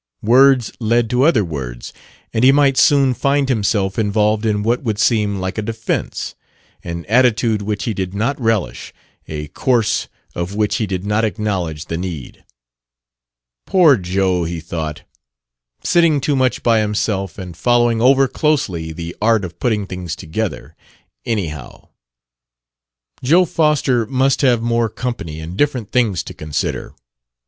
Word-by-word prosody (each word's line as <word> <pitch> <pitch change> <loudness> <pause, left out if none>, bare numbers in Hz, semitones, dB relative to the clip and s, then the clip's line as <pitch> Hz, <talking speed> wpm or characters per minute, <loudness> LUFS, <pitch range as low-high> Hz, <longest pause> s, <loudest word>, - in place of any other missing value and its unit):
Words 130 +1 +5
led 115 0 +1
to 125 0 +2
other 135 - +4
words, 65 -7 -6 0.4
and 110 - 0
he 130 - +7
might 140 -1 +3
soon 135 -1 +4
find 140 +2 +1
himself 105 -5 0
involved 105 +1 +1
in 105 -1 0
what 120 +3 +1
would 110 -6 -2
seem 105 -3 +1
like 95 +3 -3
a - - 0
defense 115 +1 -3 0.5
an 85 -1 -6
attitude 115 -2 +2
which 105 0 -3
he 115 - -2
did 95 -1 -4
not 120 +7 -1
relish, 115 -4 -1 0.3
a 75 -1 -5
course 120 - 0 0.3
of 85 +3 -4
which 105 -1 0
he 110 -4 -1
did 95 0 -4
not 105 +2 +1
acknowledge 95 -8 -2
the 85 - -4
need. 85 -8 -7 1.2
"Poor 170 -7 +5
Joe!" 95 -2 0
he 85 0 -4
thought; 80 -2 -5 0.8
"sitting 170 -4 +3
too 140 +2 0
much 130 -2 0
by 115 -2 +3
himself 105 -3 -1
and 90 -3 -8
following 120 +5 +2
over 135 +2 +5
closely 100 - -1
the 85 +1 -7
art 110 -2 +2
of 85 - -10
putting 110 -5 0
things 90 -4 -5
together 95 +5 -5 0.5
anyhow!" 80 - -4 1.3
Joe 170 +8 +4
Foster 150 -8 +1
must 135 +2 +1
have 120 -5 +3
more 115 -1 +1
company 110 -10 -5
and 80 +3 -7
different 125 -4 -1
things 110 -8 +1
to - - -9
consider. 75 -1 -4
110 Hz, 145 wpm, -18 LUFS, 90-125 Hz, 1.3 s, he